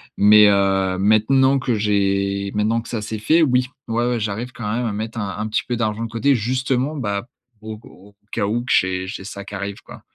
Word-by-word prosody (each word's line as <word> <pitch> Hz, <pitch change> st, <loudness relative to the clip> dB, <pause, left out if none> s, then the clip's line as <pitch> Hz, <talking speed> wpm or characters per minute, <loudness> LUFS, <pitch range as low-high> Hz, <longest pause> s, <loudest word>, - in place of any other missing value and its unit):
Mais 105 Hz, +1 st, +7 dB
heu, 95 Hz, -2 st, +2 dB
maintenant 130 Hz, +7 st, +3 dB
que 125 Hz, -3 st, -1 dB
j'ai 100 Hz, -1 st, 0 dB
maintenant 110 Hz, +2 st, +1 dB
que 115 Hz, -, -9 dB
ça, 115 Hz, -3 st, -4 dB
c'est 110 Hz, 0 st, -5 dB
fait, 160 Hz, +10 st, +3 dB
oui. 125 Hz, -3 st, +2 dB, 0.2 s
Ouais, 120 Hz, +2 st, 0 dB
ouais 120 Hz, -2 st, 0 dB
j'arrive 110 Hz, +5 st, -4 dB
quand 105 Hz, -3 st, -4 dB
même 120 Hz, +1 st, -1 dB
à 110 Hz, -, -2 dB
mettre 110 Hz, +2 st, -5 dB
un 100 Hz, -1 st, -4 dB
un 110 Hz, +1 st, -3 dB
petit -, -, 0 dB
peu 120 Hz, -, -1 dB
d'argent 110 Hz, -1 st, -2 dB
de -, -, -7 dB
côté 125 Hz, +5 st, +2 dB
justement, 130 Hz, +4 st, -1 dB
bah, 105 Hz, -3 st, -3 dB, 0.3 s
au 110 Hz, 0 st, -7 dB
au 100 Hz, +2 st, -17 dB, 0.2 s
cas 100 Hz, -, -1 dB
où 120 Hz, +3 st, -1 dB
que -, -, -4 dB
j'ai 95 Hz, 0 st, +1 dB
j'ai 95 Hz, +1 st, -7 dB
ça 100 Hz, 0 st, -7 dB
qui 100 Hz, -, -12 dB
arrive, 100 Hz, 0 st, -5 dB
quoi. -, -, -12 dB
110 Hz, 225 wpm, -21 LUFS, 100-120 Hz, 0.3 s, Mais